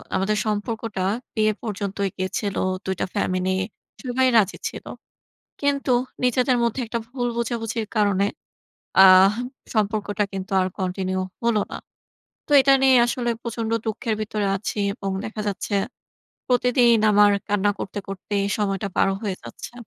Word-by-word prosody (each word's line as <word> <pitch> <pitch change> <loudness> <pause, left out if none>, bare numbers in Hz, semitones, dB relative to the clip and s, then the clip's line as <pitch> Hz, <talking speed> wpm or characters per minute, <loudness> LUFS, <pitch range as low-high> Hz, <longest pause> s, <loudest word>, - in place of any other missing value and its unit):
আমাদের 200 +3 +1
সম্পর্কটা 215 -1 -2 0.3
বিয়ে 215 0 +3
পর্যন্তই 200 -2 -2
গেছিল। 195 +2 -2 0.3
২ 190 0 -1
টা - - +1
ফ্যামিলি 185 0 0 0.5
সবাই 260 0 +1
রাজি 205 -3 +2
ছিল। - - -10 0.8
কিন্তু 280 -2 +1 0.3
নিজেদের 250 0 +2
মধ্যে 235 +2 0
একটা 230 +1 -2
ভুল 245 -1 -2
বোঝাবুঝির 230 -1 -2
কারণে 200 -1 +3 0.8
আহ 190 +1 +8 0.4
সম্পর্কটা 210 -1 0
কিন্তু 190 0 -5
আর 185 - +1
কন্টিনিউ 185 0 -2 0.2
হলো 230 -3 +3
না। - - -5 0.7
তো - - -9
এটা 275 +1 +5
নিয়ে 265 -1 +6
আসলে 240 0 -1
প্রচন্ড 230 -1 -4
দুঃখের 220 0 -2
ভিতরে 210 -1 -2
আছি, 210 - -5 0.2
এবং 195 -1 -5 0.2
দেখা 215 0 -5
যাচ্ছে 205 +1 -3 0.8
প্রতিদিন 245 -1 +4
আমার 205 0 +6 0.2
কান্না 205 0 +2
করতে, 205 - -5
করতে 195 +1 -6 0.2
সময়টা 200 -1 -1
পার - - +4
হয়ে 200 -4 -2
যাচ্ছে। - - -9
210 Hz, 135 wpm, -23 LUFS, 195-235 Hz, 0.8 s, আহ